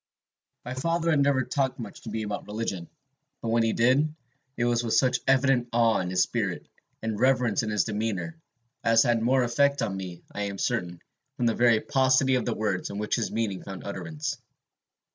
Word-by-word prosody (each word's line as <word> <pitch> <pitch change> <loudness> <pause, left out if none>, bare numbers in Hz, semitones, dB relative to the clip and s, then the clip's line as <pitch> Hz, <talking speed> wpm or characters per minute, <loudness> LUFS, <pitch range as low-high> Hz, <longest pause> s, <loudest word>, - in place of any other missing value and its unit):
"My 125 - -4
father 165 +5 0
had 155 - +3
never 140 -2 +3
talked 130 +1 -1
much 115 -4 -8
to - - -8
me 110 - -3
about 105 -1 -5
religion; 105 -5 -4 0.5
but 115 - -4
when 115 +1 +3
he 115 0 +2
did, 130 +7 +3 0.5
it 120 - +1
was 120 0 +1
with 115 - 0
such 125 -1 +3
evident 130 -2 +3
awe 115 -1 +3
in 90 - -2
his 90 0 +3
spirit, - - -3 0.4
and 110 -2 -2
reverence 125 -3 +3
in 110 - -3
his 105 -3 +2
demeanor, 110 - -3 0.5
as 115 0 +5
had 120 -2 +2
more 130 +2 +3
effect 140 +4 +2
on 95 - -2
me, 90 -2 -7
I 105 - -5
am 100 -1 -5
certain, 85 -2 -2 0.4
from 125 - 0
the 115 - +3
very 120 -2 +4
paucity 130 0 +3
of 125 - +1
the 120 - -1
words 100 -4 -2
in 100 - -6
which 105 0 -3
his 115 - -2
meaning 105 -4 -2
found 95 -1 -8
utterance. 150 +7 -4
115 Hz, 200 wpm, -27 LUFS, 105-130 Hz, 0.5 s, as